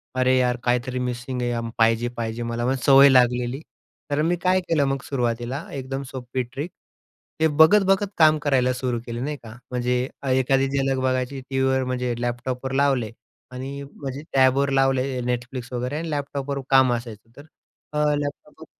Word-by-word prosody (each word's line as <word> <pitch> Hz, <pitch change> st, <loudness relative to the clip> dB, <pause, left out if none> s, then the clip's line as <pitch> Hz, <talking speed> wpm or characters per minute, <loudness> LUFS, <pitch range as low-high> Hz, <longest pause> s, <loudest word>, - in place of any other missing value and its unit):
अरे 130 Hz, 0 st, +3 dB
यार 125 Hz, -1 st, +2 dB
काहीतरी 125 Hz, +1 st, 0 dB
मिसिंग 125 Hz, +1 st, -3 dB
आहे, 120 Hz, -1 st, -2 dB
पाहिजे, 115 Hz, +1 st, +3 dB
पाहिजे 115 Hz, 0 st, -3 dB
मला, 115 Hz, 0 st, -2 dB
पण 130 Hz, +2 st, +1 dB
सवय 140 Hz, 0 st, +8 dB
लागलेली. 125 Hz, 0 st, +3 dB, 0.5 s
तर 145 Hz, +1 st, +1 dB
मी 170 Hz, +3 st, +2 dB
काय 185 Hz, 0 st, +3 dB
केलं 155 Hz, -4 st, +3 dB
मग 135 Hz, -1 st, -1 dB
सुरुवातीला 125 Hz, +2 st, -2 dB
एकदम 135 Hz, 0 st, -4 dB
सोपी 130 Hz, 0 st, -4 dB
ट्रिक. 135 Hz, +8 st, -6 dB, 0.7 s
ते 160 Hz, -, +4 dB
बघत-बघत 195 Hz, +6 st, +4 dB
काम 155 Hz, -1 st, +6 dB
करायला 130 Hz, -3 st, +2 dB
सुरू 125 Hz, -2 st, -2 dB
केलं 120 Hz, +1 st, -4 dB
नाही 150 Hz, +1 st, -3 dB
का, 110 Hz, -, -10 dB, 0.2 s
म्हणजे 125 Hz, 0 st, 0 dB, 0.3 s
एखादी 135 Hz, +1 st, +2 dB
झलक 135 Hz, -1 st, 0 dB
बघायची 130 Hz, +1 st, -1 dB
टीव्हीवर, 130 Hz, 0 st, +1 dB
म्हणजे 125 Hz, -1 st, -2 dB
लॅपटॉपवर 125 Hz, +2 st, -3 dB
लावले 130 Hz, -6 st, +1 dB, 0.4 s
आणि 135 Hz, +2 st, -6 dB
म्हणजे 140 Hz, 0 st, -7 dB
टॅबवर 135 Hz, +1 st, +4 dB
लावले 135 Hz, -1 st, +2 dB, 0.2 s
Netflix 125 Hz, 0 st, -4 dB
वगैरे, 125 Hz, +4 st, -2 dB
आणि 165 Hz, +1 st, -4 dB
लॅपटॉपवर 140 Hz, -1 st, -3 dB
काम 130 Hz, -2 st, +5 dB
असायचं 115 Hz, -2 st, -6 dB
तर 145 Hz, -, -12 dB, 0.5 s
अ, -, -, -2 dB, 0.2 s
लॅपटॉपवर 145 Hz, +2 st, -6 dB
130 Hz, 155 wpm, -23 LUFS, 125-140 Hz, 0.7 s, सवय